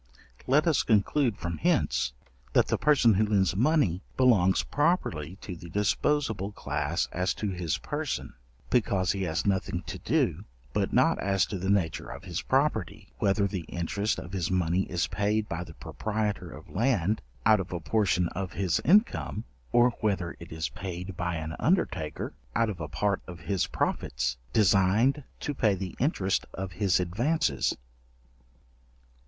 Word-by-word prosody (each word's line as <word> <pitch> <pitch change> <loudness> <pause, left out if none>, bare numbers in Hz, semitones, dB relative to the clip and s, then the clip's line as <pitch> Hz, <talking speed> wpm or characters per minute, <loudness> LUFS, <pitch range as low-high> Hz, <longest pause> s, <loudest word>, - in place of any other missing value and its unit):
Let 145 +5 +4
us 160 -5 +3
conclude 115 +2 +2
from 85 -2 -4
hence, 65 -1 +1 0.4
that - - +4
the - - +2
person 140 -7 +5
who 105 +3 +3
lends 95 -4 +2
money 120 - +2 0.2
belongs 105 -8 +4
properly 115 - 0
to 90 - -6
the 85 0 -10
disposable 105 - 0
class 75 -1 -2
as 90 +1 0
to 105 -2 -2
his 90 -4 -1
person, - - -4 0.4
because 95 -6 +2
he 100 - -3
has 80 -1 -1
nothing 95 -3 0
to - - -6
do; - - 0 0.3
but - - 0
not - - +3
as 95 -4 +2
to 95 - -5
the 95 +2 -2
nature 95 -6 0
of 70 +4 -8
his 90 -3 -4
property, 130 - 0
whether 100 +1 +2
the 95 -2 -2
interest 100 +5 -1
of 90 - -8
his 90 -4 -1
money 90 0 +1
is 90 -1 0
paid 105 +1 0
by 85 +1 -3
the 80 -2 -12
proprietor 105 -4 -3
of 75 0 -11
land 110 -2 +1 0.2
out 110 0 +6
of 95 -1 -5
a 90 - -2
portion 90 0 +1
of 95 0 -5
his 90 -5 0
income, 195 - +3 0.3
or 120 +1 +5
whether 95 -5 -1
it 85 - -11
is 80 0 -3
paid 90 0 -6
by 85 0 -2
an 80 0 -4
undertaker, 150 - 0 0.2
out 115 -2 +2
of 85 -5 -8
a 75 - -3
part 95 +6 0
of 90 0 -9
his 95 0 0
profits - - -1 0.2
designed 110 - +3 0.2
to 145 - -3
pay 110 -7 +2
the 95 -1 -5
interest 105 - 0
of 95 0 -4
his 95 -2 +2
advances. 120 - 0
95 Hz, 160 wpm, -28 LUFS, 85-110 Hz, 0.4 s, out